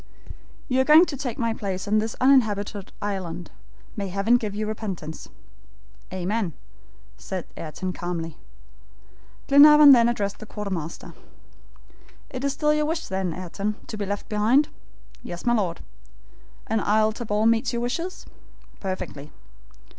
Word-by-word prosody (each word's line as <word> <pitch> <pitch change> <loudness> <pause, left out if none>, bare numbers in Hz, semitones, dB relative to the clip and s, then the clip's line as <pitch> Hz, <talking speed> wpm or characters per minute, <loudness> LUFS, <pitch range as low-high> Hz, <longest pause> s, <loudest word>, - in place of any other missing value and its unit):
"You 260 0 +2
are - - +3
going 305 +5 +7
to 295 - -5
take 250 -4 -4
my 230 -1 0
place 195 -2 -4
on 215 +1 +3
this 220 +1 -3
uninhabited 210 -7 +2
island. 180 -4 -4 0.4
May 200 -2 -3
Heaven 200 +6 +2
give 215 -4 -4
you 215 +1 -2
repentance!" 195 -8 -5 0.8
"Amen," 185 0 -2 0.6
said 185 -3 -5
Ayrton, 180 +4 -5
calmly. 170 -3 -4 1.1
Glenarvan 295 +1 +9
then 235 -3 +6
addressed 205 -4 -2
the 215 - -10
quartermaster. 190 -7 -5 1.2
"It 255 0 -5
is 280 - +1
still 300 0 +2
your 300 0 +1
wish, 325 +1 -3
then, 190 -2 -1
Ayrton, 190 +5 -4
to - - -7
be 205 -2 -4
left 205 +1 -4
behind?" 225 +7 +3 0.5
"Yes, 175 +5 -8
my 240 - +3
Lord!" 185 -7 -1 0.8
"And 220 -1 0
Isle 215 +2 +3
Tabor 215 -2 -1
meets 230 +2 +3
your 235 0 -2
wishes?" 335 +9 -4 0.5
"Perfectly." 185 -6 -5
210 Hz, 140 wpm, -24 LUFS, 190-245 Hz, 1.2 s, Glenarvan